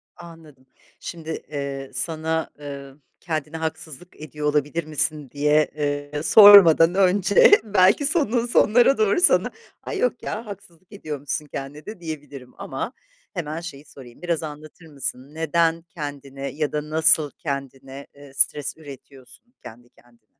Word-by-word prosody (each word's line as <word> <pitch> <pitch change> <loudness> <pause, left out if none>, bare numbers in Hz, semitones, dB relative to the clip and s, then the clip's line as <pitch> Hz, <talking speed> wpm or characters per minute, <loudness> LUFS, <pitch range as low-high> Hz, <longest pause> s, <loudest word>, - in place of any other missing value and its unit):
Anladım. 165 -6 -15 0.3
Şimdi, 165 -2 -9 0.2
eee, 140 -2 -5
sana, 160 +4 -2
ııı, 140 -1 -9 0.2
kendine 155 -1 -5
haksızlık 160 +1 -7
ediyor 150 0 -5
olabilir 150 +3 -1
misin 150 -2 +1
diye, 150 +1 +1 0.4
ııı, 150 0 -4
sormadan 180 -2 +8
önce 195 - +4
belki 205 +5 +3
sonunun, 265 - +1
sonlarına 245 +2 +3
doğru 215 - +1
sana, 370 - +3 0.3
ay - - -5
yok 250 -1 -1
ya 225 +2 -5
haksızlık 185 -4 -13
ediyormuşsun 150 -4 -3
kendine 145 +1 -8
de 215 -3 -9
diyebilirim 145 -6 -9
ama - - -6 0.4
hemen 155 -1 -5
şeyi 150 -4 -10
sorayım, 130 -2 -15
biraz 170 -2 -2
anlatır 155 +2 -10
mısın 140 -1 -6
neden 165 +1 0
kendine 145 -4 -8
ya 150 0 -3
da 150 0 -4
nasıl 155 -1 +3
kendine, 135 -2 -7
ııı, 140 -1 -15
stres 145 +2 +1
üretiyorsun 140 - -15
kendi 120 +2 -13
kendine? 120 -3 -27
155 Hz, 130 wpm, -22 LUFS, 140-170 Hz, 0.4 s, sormadan